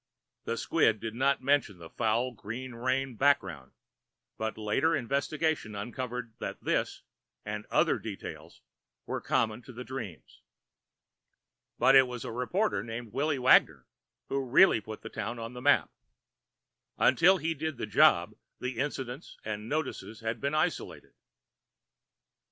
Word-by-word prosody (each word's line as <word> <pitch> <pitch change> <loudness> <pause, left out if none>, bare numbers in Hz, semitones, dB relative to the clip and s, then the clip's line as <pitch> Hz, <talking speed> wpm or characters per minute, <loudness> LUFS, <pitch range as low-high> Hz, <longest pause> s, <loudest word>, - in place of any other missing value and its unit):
The - - -2
squib 110 -1 +2
did 110 +1 -5
not 135 +2 +1
mention 140 -8 +2
the 85 -1 -12
foul 120 +2 0
green 120 +4 -7
rain 130 +2 -1
background, 95 - +1 0.6
but 110 0 -3
later 110 +10 +1
investigation 140 -2 -1
uncovered 120 +2 -5
that - - -6
this - - -1 0.4
and 105 0 -5
other - - +2
details - - -8 0.4
were - - -3
common 110 0 0
to 130 - -12
the 125 +1 -7
dreams. 110 - -8 1.4
But - - +5
it 135 -1 +8
was 125 0 -6
a 125 - -4
reporter 125 - 0
named 115 -1 -7
Willy 145 +2 0
Wagoner 130 0 +4 0.4
who 135 0 -1
really 130 - +5
put 110 +1 -9
the - - -6
town 120 +1 -4
on 115 +1 -6
the 125 - -8
map. 145 +2 +3 1.1
Until 185 +3 +5
he 165 -1 -1
did 160 -2 -4
the - - -3
job, 105 - +4 0.3
the 125 -1 -4
incidents 135 0 -4
and 105 +1 -4
notices 145 -7 -3
had 115 0 -3
been 140 +2 -1
isolated. 155 - -2
125 Hz, 140 wpm, -30 LUFS, 110-140 Hz, 1.4 s, it